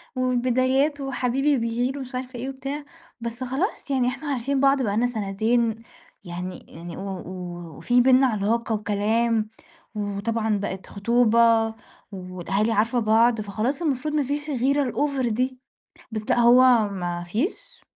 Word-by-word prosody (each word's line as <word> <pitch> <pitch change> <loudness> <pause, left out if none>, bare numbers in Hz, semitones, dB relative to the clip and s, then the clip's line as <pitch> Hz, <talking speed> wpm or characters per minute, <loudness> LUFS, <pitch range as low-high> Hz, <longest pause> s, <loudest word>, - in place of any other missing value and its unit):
والبدايات 255 +3 +1
وحبيبي 270 +2 +1
بيغير 240 +3 -1
ومش 260 -2 -7
عارفة 255 -1 -5
إيه 260 +3 -4
وبتاع، 275 +2 -5 0.4
بس 235 +2 -5
خلاص 280 - -2
يعني 255 -2 +2
إحنا 265 +4 -4
عارفين 275 +1 -1
بعض 275 0 +4
بقى 205 -2 0
لنا 245 +2 +3
سنتين 225 +1 0 0.5
يعني 180 0 -7
يعني 170 +1 -9
و 195 -1 -5 0.5
وفي 245 0 +3
بيننا 260 +1 +5
علاقة 225 +1 0
وكلام، 215 +2 0 0.5
وطبعًا 210 +1 -1
بقت 195 -1 -5
خطوبة 230 +1 +3 0.4
والأهالي 190 +3 -2
عارفة 225 +3 +2
بعض، 225 +1 +3
فخلاص 220 - -2
المفروض 300 -1 -1
ما 300 -1 +2
فيش 290 +3 -3
الغيرة 275 0 +1
الأوڤر 280 -4 0
دي، 255 +3 -1 0.5
بس 220 -1 -3
لأ - - +3
هو 240 -2 +6
ما 175 -3 -4
فيش. 220 - -3
240 Hz, 135 wpm, -24 LUFS, 215-265 Hz, 0.5 s, هو